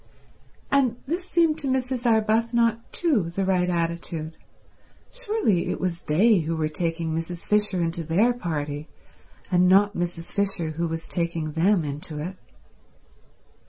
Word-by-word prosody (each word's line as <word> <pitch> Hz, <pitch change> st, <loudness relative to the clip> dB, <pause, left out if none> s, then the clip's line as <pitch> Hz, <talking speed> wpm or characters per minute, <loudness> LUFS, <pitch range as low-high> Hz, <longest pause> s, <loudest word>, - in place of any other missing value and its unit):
And 270 Hz, -4 st, +3 dB
this 350 Hz, +6 st, -3 dB
seemed 330 Hz, -2 st, +3 dB
to 285 Hz, -, -3 dB
Mrs. 255 Hz, -1 st, -1 dB
Arbuthnot 230 Hz, +1 st, +2 dB
too 265 Hz, -, +1 dB
the 190 Hz, +3 st, -2 dB
right 180 Hz, -1 st, +2 dB
attitude. 165 Hz, -2 st, -2 dB, 0.8 s
Surely 425 Hz, -, 0 dB
it -, -, -2 dB
was 180 Hz, -2 st, -2 dB
they 195 Hz, +7 st, +4 dB
who 165 Hz, +1 st, -2 dB
were 155 Hz, -1 st, 0 dB
taking 165 Hz, 0 st, -2 dB
Mrs. 165 Hz, +1 st, -5 dB
Fisher 210 Hz, -3 st, +2 dB
into 170 Hz, 0 st, -1 dB
their 195 Hz, +10 st, +3 dB
party, 150 Hz, -8 st, -4 dB, 0.6 s
and 180 Hz, 0 st, +4 dB
not 200 Hz, +2 st, +5 dB
Mrs. 175 Hz, -1 st, -3 dB
Fisher 195 Hz, -5 st, 0 dB
who 170 Hz, +2 st, -2 dB
was 165 Hz, 0 st, -5 dB
taking 170 Hz, -3 st, -2 dB
them 170 Hz, +2 st, +2 dB
into 150 Hz, +2 st, -5 dB
it? 175 Hz, +6 st, -5 dB
180 Hz, 140 wpm, -25 LUFS, 165-230 Hz, 0.8 s, not